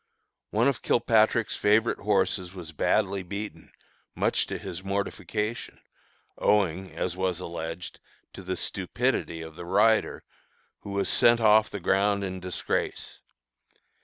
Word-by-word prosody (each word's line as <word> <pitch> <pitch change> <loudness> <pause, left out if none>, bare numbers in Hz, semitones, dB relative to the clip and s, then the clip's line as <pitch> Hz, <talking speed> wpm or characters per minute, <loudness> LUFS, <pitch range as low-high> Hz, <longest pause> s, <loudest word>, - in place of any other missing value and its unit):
One 115 +5 +2
of 140 -4 0
Kilpatrick's 110 -1 +2
favorite 110 +3 +2
horses 100 -2 0
was 85 -4 -8
badly 100 +5 +1
beaten, 100 +3 -7 0.4
much - - +1
to - - -4
his 90 +2 -7
mortification, 105 +3 -3 0.6
owing, 95 -3 +1
as 90 -1 -2
was 95 -2 -1
alleged, 85 0 -6 0.3
to - - -9
the - - -4
stupidity 80 -1 -2
of 80 -1 -10
the 85 0 -8
rider, 105 +5 +2 0.6
who - - -10
was 100 0 -1
sent 120 0 +5
off 110 -1 +5
the 100 - -5
ground 100 +2 +2
in 95 -1 -4
disgrace. 90 -1 -3
100 Hz, 130 wpm, -27 LUFS, 90-105 Hz, 0.6 s, sent